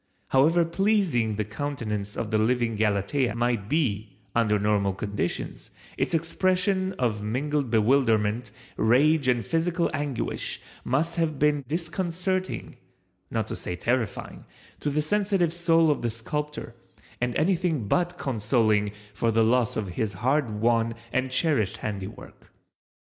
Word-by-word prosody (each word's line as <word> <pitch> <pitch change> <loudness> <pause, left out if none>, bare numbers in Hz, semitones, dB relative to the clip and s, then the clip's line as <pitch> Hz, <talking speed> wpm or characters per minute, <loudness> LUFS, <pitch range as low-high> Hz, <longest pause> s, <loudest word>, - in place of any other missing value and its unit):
However 160 +6 +4
pleasing 170 - +1
the 105 0 -1
countenance 105 -4 -4
of 110 - -3
the 110 - +2
living 115 0 +1
Galatea 105 +4 +1
might 120 -4 0
be 110 -11 -1 0.2
under 110 -3 +3
normal 100 -1 +1
conditions 100 -3 -3 0.3
its - - 0
expression 185 +3 +1
of 115 - -1
mingled 135 +5 -1
bewilderment, 115 -1 +2 0.3
rage 140 +6 +4
and 120 -2 +2
physical 170 +1 0
anguish 145 -4 -2 0.2
must 160 +7 0
have 160 -3 0
been 145 0 +2
disconcerting, 175 +3 -2 0.5
not - - -1
to - - -5
say 90 - -4
terrifying, 115 +4 -2 0.3
to 150 - -1
the 150 +1 0
sensitive 195 -2 +1
soul 165 -2 +4
of 145 - -1
the 120 - 0
sculptor, 145 +3 -4 0.5
and 125 0 0
anything 165 - +1
but 175 - +1
consoling 110 -4 +1 0.2
for 115 - 0
the 115 0 +3
loss 115 0 +2
of 105 -3 -2
his 100 +3 -2
hard 130 +7 +1
won 115 +2 +1 0.2
and 130 0 +1
cherished 130 - +1
handiwork. 100 0 -7
125 Hz, 130 wpm, -26 LUFS, 110-160 Hz, 0.5 s, However